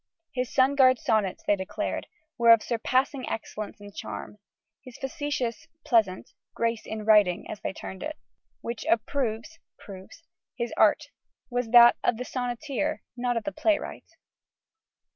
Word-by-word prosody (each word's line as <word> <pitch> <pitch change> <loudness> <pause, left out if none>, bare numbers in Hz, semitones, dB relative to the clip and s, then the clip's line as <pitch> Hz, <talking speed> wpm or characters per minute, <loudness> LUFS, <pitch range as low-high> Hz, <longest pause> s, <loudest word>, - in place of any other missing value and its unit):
His 250 -2 -2
"sugared 260 -1 +5
sonnets," 220 -10 0
they 205 - +3
declared, 190 0 -4 0.3
were 235 -1 +3
of 230 -2 +8
surpassing 255 +3 0
excellence 215 -1 -6
and 205 -1 -12
charm. 210 - -7 0.4
"His 255 -2 -12
facetious 270 -4 -3 0.2
(pleasant) 210 -6 +1 0.2
grace 230 -1 -1
in 215 -1 -5
writing," 210 -5 +4
as 210 - -7
they - - -3
termed 190 -1 -8
it, 310 0 -5 0.4
"which 235 -1 -5
approves 230 +5 -1 0.2
(proves) 195 - -12 0.3
his 235 -1 -3
art," - - +3 0.4
was 245 -1 -1
that 240 0 +8
of 235 - +2
the 250 - -5
sonneteer, 250 +2 -3
not 245 -2 -1
the 300 - -2
playwright. 310 +1 -2
235 Hz, 135 wpm, -27 LUFS, 215-260 Hz, 0.4 s, of